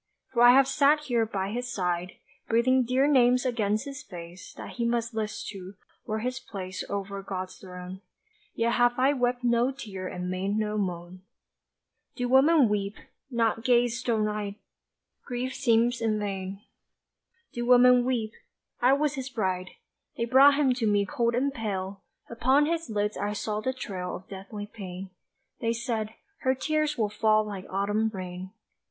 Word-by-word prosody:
For 235 - +2
I 240 0 +9
have 270 0 +6
sat 285 +2 +4
here 240 -6 0
by 195 -2 -3
his 245 +2 -3
side, 180 -3 -2 0.3
Breathing 255 +3 +3
dear 255 +3 +2
names 250 -3 +4
against 215 -1 0
his 275 -2 -7
face, 175 -6 -10
That - - -8
he 235 - -1
must 235 0 0
list 215 -1 -3
to, 195 -1 -9 0.3
were 215 - -1
his 250 +2 -2
place 185 -7 -6
Over 200 0 -4
God's 185 -1 -6
throne 180 0 -9 0.5
Yet 230 +1 +1
have 245 0 +3
I 265 +3 +4
wept 245 -2 0
no 240 +1 +3
tear 205 -9 -7
and 180 0 -5
made 190 +3 -1
no 215 -1 -1
moan. 180 -1 -4 0.9
Do 245 - -1
women 270 +2 +5
weep 205 0 -1 0.3
not 230 -2 0
gaze 240 -1 +3
stone 225 -4 0
eyed? 210 -1 -3 0.7
Grief 250 +1 -3
seems 235 -1 +2
in 220 -2 +1
vain. 195 -1 -4 0.9
Do 240 0 -3
women 250 0 +7
weep? 235 -4 -1 0.5
I 250 +2 +5
was 295 +1 +1
his 265 -2 -5
bride 185 -6 -2 0.5
They 235 - 0
brought 270 +4 +7
him 280 -3 +3
to 240 -3 -1
me 205 -1 +3
cold 235 -2 0
and 275 +3 0
pale 195 -4 -4 0.3
Upon 260 +5 +3
his 330 -2 -2
lids 210 -1 -1
I 205 +1 -2
saw 210 0 -3
the 260 - 0
trail 190 -8 -5
Of 185 - -10
deathly 200 +2 -7
pain. 190 -3 -8 0.5
They 230 0 0
said, 225 -2 -3 0.2
"Her 260 -1 +1
tears 305 +2 0
will 215 -2 +1
fall 215 0 +3
like 195 -3 -7
autumn 205 +3 0
rain." 185 -2 -7
225 Hz, 165 wpm, -27 LUFS, 200-250 Hz, 0.9 s, I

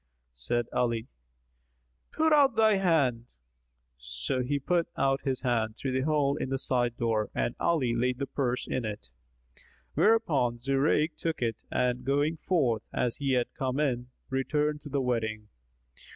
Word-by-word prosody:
Said 120 - -1
Ali, 115 -2 0 1.0
"Put 315 0 +2
out 280 -5 +5
thy 220 -2 +4
hand." 145 -11 +2 0.7
So 65 - -3
he 140 +3 0
put 170 +4 0
out 135 0 +2
his 130 -2 -2
hand 115 -4 0
through 135 - -3
the 130 +2 0
hole 145 -2 +2
in 130 - -3
the 135 - 0
side 120 -2 0
door 110 -2 0
and 120 - 0
Ali 145 -9 +1
laid 125 +2 0
the 140 - -2
purse 125 -2 -2
in 130 - -2
it; 105 - -6 0.8
whereupon 145 - +2
Zurayk 140 +5 +1
took 165 -6 -2
it 115 -2 -1
and 125 0 0
going 145 +4 +1
forth, 135 - +1
as 120 -2 -1
he 140 -2 0
had 125 -1 0
come 130 +1 -2
in, 125 -5 0 0.2
returned 150 +3 0
to 145 - -9
the 140 0 0
wedding. 110 -4 -2
130 Hz, 155 wpm, -29 LUFS, 120-150 Hz, 1.0 s, out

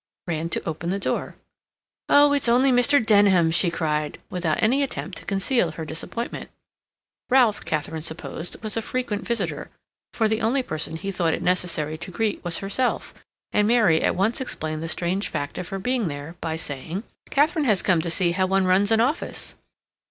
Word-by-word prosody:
ran 165 -1 -2
to - - -3
open 165 +1 -3
the 195 - 0
door. 200 - -2 0.7
"Oh, 290 0 +6
it's 280 -4 +2
only 255 +3 +4
Mr. 245 0 +4
Denham!" 200 -6 +5
she 175 +2 +2
cried, 150 -3 -2
without 170 -4 -1
any 250 +6 +3
attempt 245 -8 -3
to - - -15
conceal 195 -3 +1
her 160 +1 -6
disappointment. 165 +9 -5 0.8
Ralph, 245 -5 +4
Katharine 155 +1 -2
supposed, 165 +4 -4
was 215 -1 +3
a 225 - 0
frequent 225 -3 -3
visitor, 235 -1 -2 0.4
for 225 - +1
the 220 0 0
only 250 +4 +1
person 155 -5 -4
he 195 +4 -4
thought 170 -4 +1
it - - -6
necessary 170 -4 -1
to 180 - -6
greet 210 +3 -2
was 175 -2 0
herself, 200 +6 -1 0.4
and 210 0 +2
Mary 215 -9 +4
at - - +1
once 210 +7 0
explained 155 -10 -4
the 165 - -3
strange 180 +4 -1
fact 145 +4 -4
of 180 - -5
her 195 - -4
being 245 +1 0
there 145 +2 -6
by 160 -1 -2
saying: 160 +5 -5 0.3
"Katharine 305 +2 +2
has 210 -6 +3
come 175 -4 +3
to 170 - -2
see 170 +1 +2
how 185 +2 +1
one 195 0 +2
runs 190 +2 +3
an 225 0 +4
office." 285 +8 -2
190 Hz, 185 wpm, -24 LUFS, 165-230 Hz, 0.8 s, Oh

